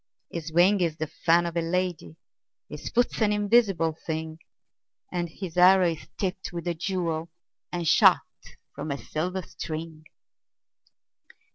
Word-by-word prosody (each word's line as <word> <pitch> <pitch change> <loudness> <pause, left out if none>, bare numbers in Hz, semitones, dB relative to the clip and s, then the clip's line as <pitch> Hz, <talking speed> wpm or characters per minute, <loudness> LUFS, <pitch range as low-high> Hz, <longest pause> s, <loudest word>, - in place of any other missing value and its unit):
His 165 -1 -5
wing 185 +4 +4
is 165 -3 0
the 155 - -2
fan 170 +3 +2
of 170 0 -4
a 170 - +1
lady, 170 - -2 0.5
His 150 - -7
foot's 240 -1 0
an 210 -1 +3
invisible 205 -6 +3
thing, 160 0 -4 0.7
And 175 -1 -2
his 180 0 -8
arrow 180 -1 +6
is 160 - -8
tipped 190 -1 -3
with 170 -1 -6
a 175 - +1
jewel, 170 -2 -2 0.4
And 175 -2 -3
shot - - +6 0.5
from - - -6
a 140 - -2
silver 180 +6 -3
string. 155 0 -7
170 Hz, 140 wpm, -26 LUFS, 160-185 Hz, 0.7 s, arrow